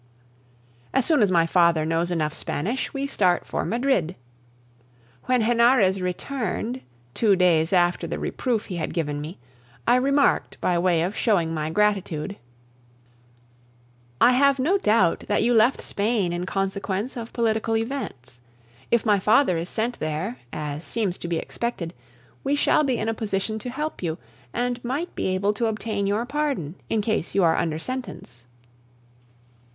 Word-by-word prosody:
As 265 - +3
soon 310 -6 +3
as 205 - +4
my 170 -2 +4
father 170 -2 +3
knows 165 +2 0
enough 155 -3 -1
Spanish, 210 - -3
we 275 0 -3
start 185 -10 +1
for - - -2
Madrid. 220 - 0 1.1
When 250 -2 +2
Henarez 235 -4 +4
returned, 240 +6 -3 0.3
two 210 - +3
days 170 -3 +3
after 175 -1 +2
the - - -3
reproof 235 -5 -2
he 180 - -5
had 160 -1 -3
given 150 -3 -2
me, 155 +4 -7 0.5
I 245 - +5
remarked 275 +2 +2
by 180 - +1
way 170 -2 +2
of 190 +5 -2
showing 175 -8 +1
my 155 -1 -2
gratitude: 195 -2 0 1.8
"I 245 - +6
have 275 +2 +4
no 335 +10 +2
doubt 210 - +2
that 205 - +1
you 240 +1 +3
left 230 +3 +4
Spain 205 -4 0
in 175 +1 -3
consequence 195 +3 -2
of 230 -2 -6
political 225 -1 0
events. 225 - -5 0.5
If 235 0 +2
my 205 -3 +4
father 215 0 +4
is 165 +2 -3
sent 235 +2 -2
there, 155 +10 -3
as 150 +1 -5
seems 205 -5 -2
to - - -5
be 170 -1 -1
expected, 180 -4 -4 0.5
we 275 +1 +1
shall 295 +1 +3
be 260 -4 +1
in 220 - -2
a 225 - +1
position 215 0 -2
to 250 - -6
help 300 +5 -4
you, 165 -2 -2 0.3
and 245 0 -2
might 280 +8 -3
be - - -2
able 190 +2 +1
to 230 +2 0
obtain 215 -2 -2
your 210 +4 0
pardon, 275 - -2 0.2
in 220 - +1
case 215 -4 -2
you 195 - +4
are 165 -1 +4
under 155 -2 -1
sentence." 160 - -7
205 Hz, 160 wpm, -24 LUFS, 175-245 Hz, 1.8 s, I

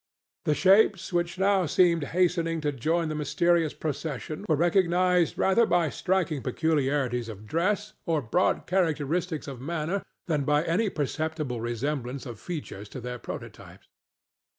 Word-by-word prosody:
The 150 - +2
shapes 195 0 +4
which 175 0 0
now 190 -2 +3
seemed 170 -1 +3
hastening 170 0 +1
to 150 -1 0
join 160 +6 0
the 155 - -2
mysterious 160 +2 +1
procession 155 +3 -4
were 155 - +4
recognized 175 +1 +2
rather 215 +4 +3
by 170 -4 +2
striking 180 -6 0
peculiarities 135 -4 0
of 105 -1 -9
dress 200 - 0
or 165 -2 +2
broad 145 +8 +1
characteristics 165 -2 0
of 135 -3 -7
manner 170 +6 -2 0.2
than 150 -5 0
by 150 +2 +2
any 190 +6 +1
perceptible 155 -5 -3
resemblance 125 +3 -3
of 120 -5 -8
features 140 - -6
to 130 - -7
their 125 0 -6
prototypes. - - -9
160 Hz, 140 wpm, -27 LUFS, 140-180 Hz, 0.2 s, shapes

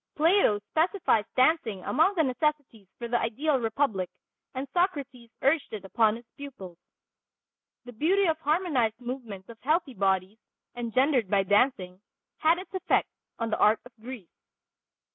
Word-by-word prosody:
Plato 325 - +4
specifies 320 - +2
dancing 255 - +2
among 325 +8 +2
the 325 - +3
necessities 265 -6 -2
for 235 - -5
the 240 0 +1
ideal 270 +5 0
republic, 225 -5 -1 0.5
and 265 +2 -4
Socrates 280 -10 -1
urged 280 +2 +2
it 205 -3 -6
upon 215 +3 +2
his 235 +1 -11
pupils. 200 - -10 1.1
The 245 - -10
beauty 370 - +2
of 320 -2 +1
harmonized 295 - 0
movements 240 -6 -7
of 230 -1 -12
healthy 305 -1 0
bodies, 195 0 0 0.4
engendered 245 -1 +1
by 195 -1 +3
dancing, 195 -3 +1 0.4
had 320 +2 +4
its 370 +1 -10
effect 375 -2 +1 0.3
on 230 -1 -3
the - - -1
art 210 +1 +4
of 250 - -13
Greece. 235 -7 -9
250 Hz, 145 wpm, -27 LUFS, 215-310 Hz, 1.1 s, Plato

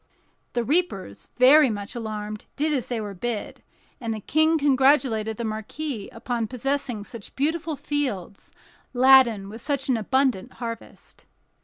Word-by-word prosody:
The 240 - 0
reapers, 265 - -1
very 265 +3 +7
much 205 -1 -5
alarmed, 215 -3 -5
did 305 +1 0
as 260 -4 -1
they 240 -2 -2
were 205 -2 -5
bid, 220 +3 -4 0.4
and 230 -4 -3
the - - -5
King 315 +8 +2
congratulated 265 -6 +3
the 235 - -3
marquis 220 +2 -4
upon 235 -3 -3
possessing 255 -2 -2
such 220 0 -11
beautiful 315 +3 -1
fields, 260 -11 -3 0.4
laden 245 -6 +6
with 220 +3 -9
such 280 -1 -2
an 250 - +3
abundant 255 -1 0
harvest. 230 -2 -8
245 Hz, 140 wpm, -25 LUFS, 215-280 Hz, 0.4 s, very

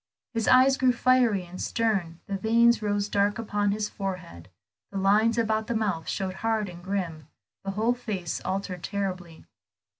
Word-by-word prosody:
His 225 -2 -1
eye 255 +1 +7
grew 260 -1 +3
fiery 245 -6 +3
and 180 +1 -9
stern, 195 -8 -1
the 200 - -3
veins 230 +3 +4
rose 205 -1 0
dark 205 0 +1
upon 205 -2 0
his 210 +1 -1
forehead, 180 - -6 0.4
the 200 - -4
lines 210 +4 +3
about 220 -1 0
the 235 - -1
mouth 200 -7 -1
showed 190 -2 -2
hard 220 -3 0
and 175 0 -11
grim, 180 -6 -3 0.4
the 195 - -4
whole 220 +5 +1
face 210 -9 -4
altered 190 -2 -3
terribly. 185 -5 -4
205 Hz, 160 wpm, -27 LUFS, 185-225 Hz, 0.4 s, eye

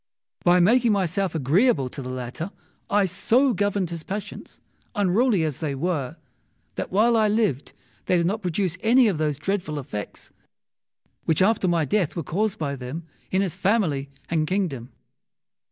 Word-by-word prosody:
By 175 +1 +5
making 230 +5 +4
myself 190 -2 0
agreeable 155 - +2
to 140 - -7
the 125 - -6
latter, 130 +7 -5 0.4
I 205 -1 +3
so 240 +8 +2
governed 200 -3 0
his 170 -1 -5
passions, 205 +4 -7 0.4
unruly 205 0 +2
as 155 -4 -2
they 150 -4 -2
were, 145 -3 -2 0.6
that - - -5
while 225 +5 +4
I 220 -1 +4
lived 205 - 0 0.3
they 180 - +2
did 170 - +1
not 210 +5 -1
produce 185 -1 -1
any 245 +2 +5
of 185 -7 0
those 150 -3 0
dreadful 175 -2 -2
effects 125 -7 -7 0.9
which 160 +2 +3
after 200 -2 +2
my 170 -3 +2
death 180 +2 0
were 170 - -3
caused 200 +7 -1
by 140 -3 -2
them 135 +6 -6 0.2
in 190 +1 +1
his 180 -4 -2
family 180 -9 +1 0.2
and 155 -2 0
kingdom. 150 -10 -2
180 Hz, 160 wpm, -24 LUFS, 150-205 Hz, 0.9 s, By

